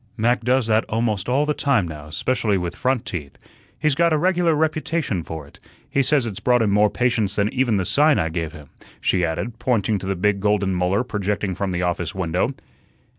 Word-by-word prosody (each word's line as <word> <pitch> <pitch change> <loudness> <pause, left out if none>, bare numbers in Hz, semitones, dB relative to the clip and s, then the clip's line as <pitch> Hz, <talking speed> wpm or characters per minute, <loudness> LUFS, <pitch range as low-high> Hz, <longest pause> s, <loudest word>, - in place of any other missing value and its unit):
Mac 120 +2 +1
does 125 +1 +2
that 110 0 +2
almost 110 -2 -1
all 140 +4 +2
the 150 - 0
time 130 -11 +1
now, 75 -1 -9
'specially 110 +4 0
with 90 -2 -3
front 130 -2 0
teeth. 75 -7 -6 0.4
He's 155 -2 +1
got 170 +4 +2
a 155 - +3
regular 175 -1 +2
reputation 155 - -1
for 80 -2 -7
it. 70 - -19 0.3
He 140 - +2
says 135 -1 +2
it's 105 -4 -5
brought 125 +2 +3
him 105 - +1
more 105 +1 +4
patients 110 -2 0
than 105 +1 0
even 125 -5 +2
the 95 - 0
sign 150 +5 +4
I 80 - 0
gave 80 -1 -3
him," 75 -3 -13 0.3
she 90 -2 +1
added, 110 +8 -3
pointing 110 -4 +1
to 95 - -7
the 95 - 0
big 100 +2 +1
golden 100 -1 +1
molar 90 +4 +1
projecting 105 -4 -2
from 95 +1 -2
the 90 0 -1
office 90 +1 -2
window. 95 +8 -1
105 Hz, 210 wpm, -22 LUFS, 95-130 Hz, 0.4 s, more